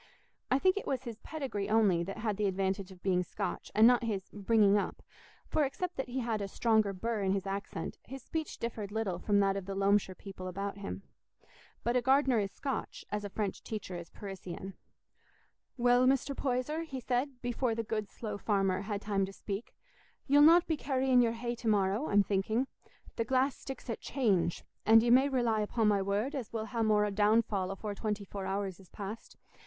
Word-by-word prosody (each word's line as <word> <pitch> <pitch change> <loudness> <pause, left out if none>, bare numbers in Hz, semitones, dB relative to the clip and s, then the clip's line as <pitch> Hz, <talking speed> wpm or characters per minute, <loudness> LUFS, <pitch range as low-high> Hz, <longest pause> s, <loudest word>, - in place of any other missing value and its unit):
I 260 - +4
think 370 +7 +3
it - - -4
was 265 -2 -1
his 235 -3 -7
pedigree 255 -10 -4
only 210 -6 +4
that 195 - -6
had 215 -2 -1
the 210 -1 +1
advantage 190 0 -1
of 180 -1 -15
being 185 -2 +2
Scotch, 200 +3 -4
and 215 +1 +7
not 245 0 +6
his 200 -5 -3
"bringing 205 0 +4
up"; 205 - -1 0.4
for 310 - +2
except 355 +6 -3
that 265 - -3
he 260 +1 -2
had 225 -3 -1
a 200 - -2
stronger 220 0 +2
burr 215 +3 -2
in 190 -1 +1
his 195 0 -1
accent, 200 +1 -4
his 270 0 -9
speech 320 +1 -4
differed 220 -3 -4
little 205 -5 -2
from 205 +2 +2
that 195 -1 +2
of 195 -1 -4
the 195 - -3
Loamshire 195 -1 +2
people 190 -2 -8
about 195 +2 -4
him. 95 - -6 0.8
But 235 +2 +1
a 250 - +4
gardener 265 -1 +4
is 200 -1 -1
Scotch, 270 +6 -4
as 210 0 -2
a 205 - -4
French 200 -1 -3
teacher 205 -4 -5
is 170 -1 -7
Parisian. 195 -1 -7 1.0
"Well, 245 +1 +4
Mr. 275 +1 +2
Poyser," 265 +5 -1
he 275 -5 -5
said, 250 +2 -1
before 245 -1 0
the 230 - -2
good 215 -2 -3
slow 210 -3 -6
farmer 195 -2 +1
had 205 0 -4
time 200 -2 +1
to - - -8
speak, 200 +2 -6 0.5
"ye'll 285 +1 +5
not 335 +3 +7
be 320 - 0
carrying 260 -2 +3
your 230 -1 +2
hay 235 +1 -3
to 240 -1 -6
morrow, 205 +5 +2
I'm 205 0 +5
thinking. 210 +6 0 0.5
The 230 - +2
glass 265 +2 +2
sticks 270 0 -8
at 230 - -4
'change,' 200 -11 +1 0.2
and 225 0 +7
ye 235 - +3
may 265 +3 +6
rely 240 -5 +1
upo' 220 +2 0
my 205 -2 +4
word 205 +8 -1
as 260 -6 -4
we'll 220 -1 -3
ha' 230 0 -3
more 210 -1 +3
downfall 205 -2 +2
afore 205 +2 -4
twenty 210 0 -3
four 195 0 -5
hours 195 -1 -2
is 190 - -17
past. 210 +2 -8
215 Hz, 200 wpm, -32 LUFS, 195-245 Hz, 1.0 s, and